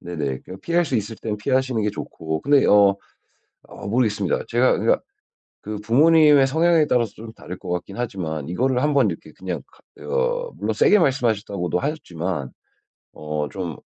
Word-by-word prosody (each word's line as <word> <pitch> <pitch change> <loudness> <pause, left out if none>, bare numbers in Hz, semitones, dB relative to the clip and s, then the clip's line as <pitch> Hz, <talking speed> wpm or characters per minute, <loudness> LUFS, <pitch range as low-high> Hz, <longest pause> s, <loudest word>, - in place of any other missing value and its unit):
네네. 75 -7 -4
그냥 95 +1 -10
피할 170 +1 +1
수 140 - -1
있을 110 +1 -3
땐 105 -2 -4
피하시는 130 0 0
게 105 - 0
좋고 80 -4 -5
근데 140 0 +4
어 100 -1 +5 0.7
어 - - -10
모르겠습니다. 105 -4 0
제가 120 +2 +3
그러니까 - - +2 0.6
그 105 0 -5
부모님의 145 +5 +5
성향에 160 +1 +3
따라서 120 -6 +1
좀 110 0 -11
다를 - - -9
것 - - -10
같긴 90 +4 -4
하지만 85 - -4
이거를 125 +6 0
한번 145 -1 +2
이렇게 - - -9
그냥 - - -4 0.3
하 - - -17
어 - - -1
물론 - - -2
세게 210 - +4
말씀하셨다고도 110 - 0
하셨지만 90 - -3 0.6
어 75 -1 -4
좀 90 -5 -5
110 Hz, 355 characters per minute, -22 LUFS, 90-140 Hz, 0.7 s, 어